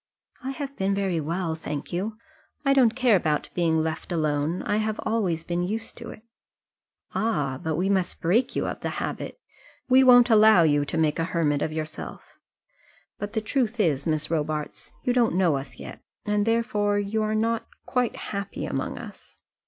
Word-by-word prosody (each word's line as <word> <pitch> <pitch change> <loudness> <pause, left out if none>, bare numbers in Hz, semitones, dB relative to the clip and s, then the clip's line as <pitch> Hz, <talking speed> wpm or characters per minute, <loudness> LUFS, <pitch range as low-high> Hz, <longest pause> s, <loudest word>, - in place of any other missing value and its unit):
"I 260 - -3
have 280 0 -6
been 195 +1 +1
very 190 -4 0
well, 165 +2 -2
thank 150 -2 -5
you. 210 +5 -2 0.5
I 275 - +5
don't 245 -5 +4
care 250 -4 +4
about 155 -5 0
being 160 -2 +2
left 160 +3 -4
alone. 155 0 0
I 205 - 0
have 215 0 -1
always 190 -8 0
been 175 +1 -2
used 220 +5 -3
to 235 -1 -8
it." 215 - -11 0.9
"Ah! 145 -12 0
but 160 -1 -1
we 180 +4 0
must 190 -3 0
break 200 +10 +1
you - - 0
of - - -4
the - - -3
habit. - - -4 0.5
We 260 +1 +7
won't 245 -1 +7
allow 215 -4 +7
you 145 -2 +3
to 160 - -3
make 155 -1 +1
a - - +2
hermit 155 -5 0
of 155 - -1
yourself. 155 0 -7 0.8
But 205 +1 -5
the 220 - 0
truth 240 0 -1
is, 155 -8 +1
Miss 155 0 -1
Robarts, 155 -1 -3
you 250 - +1
don't 235 -7 +2
know 175 -6 +3
us 135 0 -6
yet, - - -9 0.2
and 210 0 +1
therefore 210 -3 +1
you 205 +2 -1
are 215 0 0
not 225 +1 0 0.2
quite 250 -3 0
happy 200 -1 -5
among - - -3
us." - - -11
195 Hz, 185 wpm, -25 LUFS, 160-225 Hz, 0.9 s, We